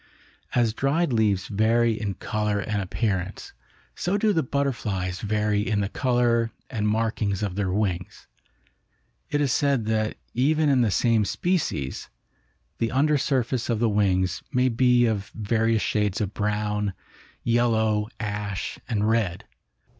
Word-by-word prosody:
As 120 -3 +3
dried 140 +4 +1
leaves 105 -4 +1
vary 115 +3 +2
in 105 -3 -3
color 105 0 -1
and 105 0 -2
appearance, 95 -1 -3 0.4
so 185 +3 0
do 210 0 +2
the 165 - +2
butterflies 110 - -2
vary 105 -1 +1
in 105 -1 0
the 100 - -1
color 120 -2 +1 0.2
and 105 -4 -1
markings 105 -2 0
of 100 -3 -2
their 95 -1 -1
wings. 95 -3 -2 1.0
It 145 - 0
is 140 -3 +1
said 140 -5 +1
that 110 0 0 0.2
even 150 +5 +2
in 135 -3 +4
the 115 - +3
same 115 +2 +2
species, 140 - -2 0.7
the 115 - +1
under 145 +3 +2
surface 130 -3 0
of 115 - +1
the 115 +1 +2
wings 95 -4 +1
may 130 -1 +3
be 125 0 +4
of 105 -3 -1
various 110 +1 +1
shades 105 -2 0
of 105 -1 -2
brown, 105 -1 -1 0.5
yellow, 110 -3 +2
ash 105 -2 -4
and 105 -3 +1
red. 110 -6 0
110 Hz, 140 wpm, -25 LUFS, 105-120 Hz, 1.0 s, in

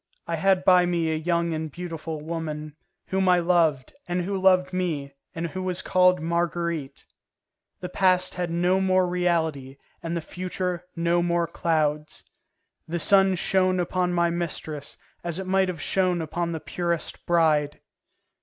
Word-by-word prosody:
I 170 - -2
had 190 +2 +2
by 180 -1 +6
me 170 -2 0
a - - 0
young 170 +1 0
and 160 -1 -4
beautiful 165 -2 -6
woman, 155 -2 -5 0.3
whom 190 0 +1
I 180 - +5
loved, 165 -6 +1
and 175 0 -1
who 195 +3 -3
loved 185 -1 +3
me, 155 -7 -2 0.2
and 165 +1 -3
who 185 +3 -5
was 185 -1 -2
called 180 0 +4
Marguerite; 170 -3 -2 0.8
the 180 - -4
past 185 0 +2
had 180 -1 -3
no 175 +3 +1
more 185 -1 +3
reality 160 -7 -1 0.2
and 170 0 -3
the - - -3
future 180 +1 -4
no 170 0 +1
more 170 0 +1
clouds. 155 -2 -1 0.6
The 170 +2 -2
sun 195 +2 +5
shone 185 +1 +1
upon 180 0 0
my 170 -1 +2
mistress 160 -4 -4 0.3
as 170 -1 -2
it 190 - -4
might 190 0 +2
have 180 -3 -4
shone 185 +1 +1
upon 170 +2 -3
the 160 - -3
purest 170 0 -3
bride. 155 -4 +2
175 Hz, 155 wpm, -25 LUFS, 160-180 Hz, 0.8 s, by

